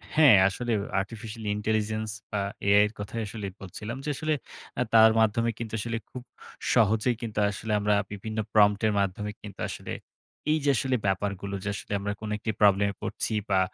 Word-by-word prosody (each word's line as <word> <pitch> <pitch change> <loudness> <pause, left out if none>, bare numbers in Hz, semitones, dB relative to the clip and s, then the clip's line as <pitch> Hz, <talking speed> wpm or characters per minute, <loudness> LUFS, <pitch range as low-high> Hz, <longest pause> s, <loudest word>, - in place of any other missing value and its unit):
হ্যাঁ, 150 -7 +8
আসলে 120 +5 -2 0.3
Artificial 110 +2 -8
Intelligence, 110 0 -1 0.2
বা, 105 - 0 0.3
AI 100 +1 +6
এর - - -9
কথাই 105 +3 -4
আসলে 105 -1 -6 0.2
বলছিলাম 105 +6 -6
যে, - - -1
আসলে 155 +3 0 0.5
আ - - +2
তার 110 0 +8
মাধ্যমে 115 +1 +2
কিন্তু 115 -2 -5
আসলে 115 +1 -2
খুব 125 - -7 0.5
সহজেই 110 +3 +3
কিন্তু 110 -2 -3
আসলে 105 +2 -5
আমরা 105 0 +2 0.2
বিভিন্ন 110 +2 -6 0.2
prompt 105 -1 +5
এর 105 - +1
মাধ্যমে 100 +2 -1
কিন্তু 100 -2 -10
আসলে - - -7 0.6
এইযে 150 -2 +1
আসলে 130 +1 +1
ব্যাপারগুলো 100 0 -1
যে 105 - -2
আসলে - - -9
আমরা 100 +1 -2
কোন 110 - -5
একটি 110 +1 -2
প্রবলেমে 100 0 +4
পড়ছি - - -2 0.2
বা, 95 -1 +4
105 Hz, 170 wpm, -27 LUFS, 100-115 Hz, 0.6 s, হ্যাঁ